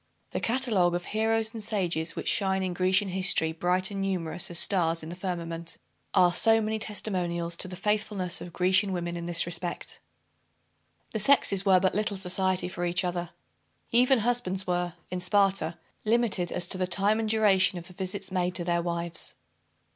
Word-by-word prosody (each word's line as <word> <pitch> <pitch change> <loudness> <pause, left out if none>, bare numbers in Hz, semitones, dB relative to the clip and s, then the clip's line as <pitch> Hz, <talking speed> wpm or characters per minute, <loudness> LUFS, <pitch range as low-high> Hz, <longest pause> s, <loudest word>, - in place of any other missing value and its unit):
The - - -2
catalogue 225 -8 +2
of 175 0 -4
heroes 220 +1 0
and 225 -2 -6
sages 175 -6 -1
which - - -5
shine 190 -2 +1
in 185 -1 -2
Grecian 185 +2 +1
history 185 -3 +2
bright 180 +4 +1
and 195 -1 -4
numerous 180 -3 -1
as 175 - -3
stars 165 -4 +2
in 160 - -7
the 175 - -6
firmament, 170 -3 -5 0.4
are 180 -2 +5
so 225 +5 +4
many 220 0 -2
testimonials 175 -5 -2
to - - 0
the 180 - -7
faithfulness 205 -2 0
of 175 - -8
Grecian 190 +2 +2
women 175 -1 -3
in 170 0 -5
this 170 -1 +1
respect. 175 +1 -4 1.1
The 220 - -1
sexes 200 -4 +4
were 185 -1 +6
but 185 0 +1
little 210 0 -1
society 185 -1 0
for 180 -1 -5
each 175 +1 0
other. 175 -1 -3 0.6
Even 250 +1 +4
husbands 205 -5 0
were, 175 -1 -2 0.2
in 180 0 -3
Sparta, 195 -4 +1 0.3
limited 220 -5 +1
as 175 - 0
to 185 +1 -3
the 185 - 0
time 200 +4 +2
and 220 -1 -1
duration 205 -4 +3
of 170 - -8
the 180 - -13
visits 190 +1 -4
made 180 -1 -1
to 175 - +1
their 170 0 0
wives. 170 -1 -3
185 Hz, 180 wpm, -27 LUFS, 175-205 Hz, 1.1 s, were